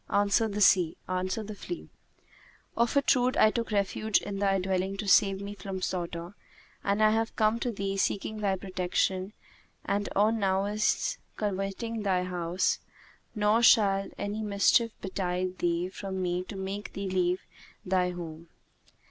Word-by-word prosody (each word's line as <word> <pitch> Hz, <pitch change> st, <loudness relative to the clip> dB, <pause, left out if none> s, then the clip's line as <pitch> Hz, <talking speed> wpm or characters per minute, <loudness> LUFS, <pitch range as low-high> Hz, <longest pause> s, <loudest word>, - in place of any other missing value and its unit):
Answered 205 Hz, +2 st, +2 dB
the 185 Hz, +2 st, +1 dB
flea, 350 Hz, -, -7 dB, 0.9 s
"Of 235 Hz, +4 st, +1 dB
a 280 Hz, -, +4 dB
truth, 255 Hz, -1 st, +2 dB
I 215 Hz, -, +6 dB
took 230 Hz, 0 st, -2 dB
refuge 210 Hz, +1 st, +1 dB
in 200 Hz, -1 st, -5 dB
thy 195 Hz, -1 st, +2 dB
dwelling 190 Hz, +1 st, -1 dB
to 210 Hz, 0 st, -4 dB
save 195 Hz, -1 st, +4 dB
me 200 Hz, +1 st, -5 dB
from 195 Hz, -1 st, -6 dB
slaughter; 170 Hz, 0 st, -3 dB, 0.5 s
and 200 Hz, +2 st, +1 dB
I 215 Hz, -, +6 dB
have 225 Hz, +1 st, 0 dB
come 220 Hz, +1 st, +2 dB
to 245 Hz, -, -1 dB
thee 195 Hz, -2 st, -3 dB
seeking 205 Hz, +2 st, -1 dB
thy 200 Hz, -2 st, +1 dB
protection 185 Hz, +1 st, -1 dB, 0.5 s
and 205 Hz, 0 st, -1 dB
on 215 Hz, +3 st, +3 dB
nowise 205 Hz, -, +1 dB, 0.2 s
coveting 205 Hz, +3 st, -3 dB
thy 190 Hz, -3 st, +1 dB
house; 180 Hz, 0 st, 0 dB, 0.6 s
nor 210 Hz, +2 st, +3 dB
shall 200 Hz, -4 st, +5 dB
any 205 Hz, +2 st, -3 dB
mischief 210 Hz, +2 st, +3 dB
betide 185 Hz, -1 st, -2 dB
thee 175 Hz, 0 st, 0 dB
from 190 Hz, 0 st, -5 dB
me 180 Hz, 0 st, -1 dB
to 200 Hz, -, -8 dB
make 195 Hz, +2 st, -5 dB
thee 195 Hz, 0 st, -4 dB
leave 185 Hz, -1 st, 0 dB, 0.4 s
thy 180 Hz, -1 st, +2 dB
home. 170 Hz, -2 st, -7 dB
195 Hz, 145 wpm, -29 LUFS, 185-215 Hz, 0.9 s, I